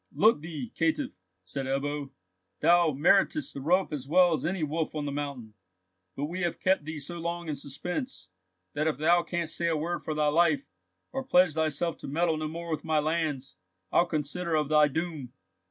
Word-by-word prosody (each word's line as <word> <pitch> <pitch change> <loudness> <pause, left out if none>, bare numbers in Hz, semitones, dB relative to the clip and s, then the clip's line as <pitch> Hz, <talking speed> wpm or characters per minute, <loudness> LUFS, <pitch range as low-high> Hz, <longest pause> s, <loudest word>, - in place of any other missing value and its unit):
"Look 215 -7 +4
thee, 165 +9 -6
caitiff!" 300 -5 0 0.3
said 130 +8 -4
Ebbo; 140 +1 -2 0.5
"thou 170 +1 +5
meritest 195 - +2
the 140 - -6
rope 175 +4 +2
as 135 -3 -4
well 175 +2 +5
as 155 - -1
any 180 -2 -1
wolf 155 +1 -2
on 150 -1 -2
the 145 - -2
mountain, 140 -6 -5 0.6
but 140 - -2
we 180 +5 -4
have 175 -2 -1
kept 185 -5 +2
thee 155 0 -5
so 170 +5 -6
long 170 0 -3
in 150 - -2
suspense, 175 - -5 0.4
that 155 +2 0
if 160 - 0
thou 170 +3 +4
canst 170 -2 -2
say 170 - 0
a 165 -2 +1
word 170 +3 -2
for 155 - -4
thy 150 -1 +2
life, 175 - +2 0.4
or 270 0 -3
pledge 180 - +4
thyself 160 +1 -1
to - - -8
meddle 160 +3 +1
no 155 0 -2
more 170 +2 -6
with 155 - -2
my 160 -1 +1
lands, 150 -3 -1 0.3
I'll 175 - +4
consider 165 +2 -2
of 150 -2 +1
thy 150 -1 +6
doom." 150 -4 -4
160 Hz, 195 wpm, -28 LUFS, 145-175 Hz, 0.6 s, thy